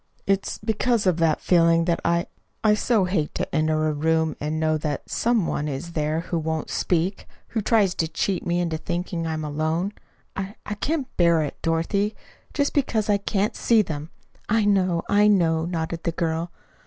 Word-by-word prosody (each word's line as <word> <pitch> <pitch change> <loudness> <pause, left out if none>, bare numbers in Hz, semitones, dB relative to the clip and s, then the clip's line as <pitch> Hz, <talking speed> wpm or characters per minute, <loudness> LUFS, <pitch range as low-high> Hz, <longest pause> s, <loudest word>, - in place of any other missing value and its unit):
It's 195 0 0
because 220 +1 0
of 180 -3 +3
that 165 -2 +2
feeling 165 -1 +4
that 170 -1 +1
I 170 0 +1 0.4
I 215 -1 +5
so 210 -1 +2
hate 180 -5 -1
to - - -3
enter 155 0 +2
a 155 - 0
room 160 +1 +1
and 155 +2 -2
know 155 0 +2
that 150 -2 -3
some 230 -5 +1
one 150 - -2
is 150 +4 -5
there 155 0 -1
who 170 0 -2
won't 160 -1 -3
speak 180 +3 0 0.2
who 225 - -1
tries 205 -3 +3
to 165 - -1
cheat 180 +3 -1
me 175 0 0
into 170 -2 -1
thinking 170 0 -3
I 160 - -1
am 155 0 -3
alone. 155 +6 -1 0.4
I 195 +1 -4
I 210 - -3
can't 280 +6 -2
bear 170 -2 +4
it, 145 - -6
Dorothy. 180 +6 0 0.4
Just 285 -1 0
because 220 -7 +1
I 205 - +4
can't 200 +1 -1
see 225 -2 +3
them 155 -3 -5 0.2
" - - -33
"I 210 - +2
know, 185 -4 +2
I 205 +1 +4
know," 165 -5 +3
nodded 165 -1 -3
the 170 - -2
girl. 165 +1 -1
170 Hz, 190 wpm, -24 LUFS, 160-200 Hz, 0.4 s, I